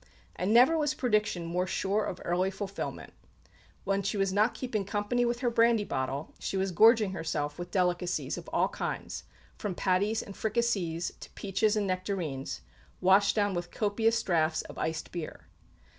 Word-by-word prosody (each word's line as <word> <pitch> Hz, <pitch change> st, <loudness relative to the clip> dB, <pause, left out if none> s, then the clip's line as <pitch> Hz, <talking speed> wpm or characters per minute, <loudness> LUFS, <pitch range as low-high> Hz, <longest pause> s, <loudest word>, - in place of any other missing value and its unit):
And 185 Hz, +3 st, -1 dB
never 250 Hz, +8 st, +6 dB
was 300 Hz, 0 st, +1 dB
prediction 210 Hz, -8 st, 0 dB
more 180 Hz, +2 st, -1 dB
sure 200 Hz, +3 st, 0 dB
of 180 Hz, -, -5 dB
early 180 Hz, +2 st, +1 dB
fulfilment. 195 Hz, 0 st, -5 dB, 0.7 s
When 195 Hz, 0 st, 0 dB
she 200 Hz, +2 st, -2 dB
was 195 Hz, -1 st, +1 dB
not 210 Hz, +4 st, +3 dB
keeping 230 Hz, -6 st, -2 dB
company 205 Hz, +5 st, 0 dB
with 240 Hz, +1 st, -1 dB
her 245 Hz, -2 st, +1 dB
brandy 230 Hz, -1 st, +4 dB
bottle, 135 Hz, -3 st, -3 dB
she 195 Hz, -, -3 dB
was 190 Hz, 0 st, 0 dB
gorging 220 Hz, +2 st, +6 dB
herself 150 Hz, -4 st, -3 dB
with 175 Hz, 0 st, -5 dB
delicacies 180 Hz, -1 st, 0 dB
of -, -, -8 dB
all -, -, +2 dB
kinds, -, -, -4 dB, 0.3 s
from 200 Hz, -4 st, -3 dB
patties 200 Hz, +5 st, +1 dB
and 200 Hz, -, -9 dB
fricassées 200 Hz, -7 st, -1 dB
to -, -, -10 dB
peaches 205 Hz, +2 st, 0 dB
and 210 Hz, -1 st, +1 dB
nectarines, 185 Hz, -7 st, -3 dB, 0.4 s
washed 195 Hz, +2 st, +4 dB
down 205 Hz, -2 st, +2 dB
with 175 Hz, 0 st, -3 dB
copious 225 Hz, +2 st, +1 dB
draughts 160 Hz, -3 st, +1 dB
of -, -, -10 dB
iced 160 Hz, 0 st, -3 dB
beer. 170 Hz, -3 st, -6 dB
195 Hz, 165 wpm, -30 LUFS, 175-215 Hz, 0.7 s, never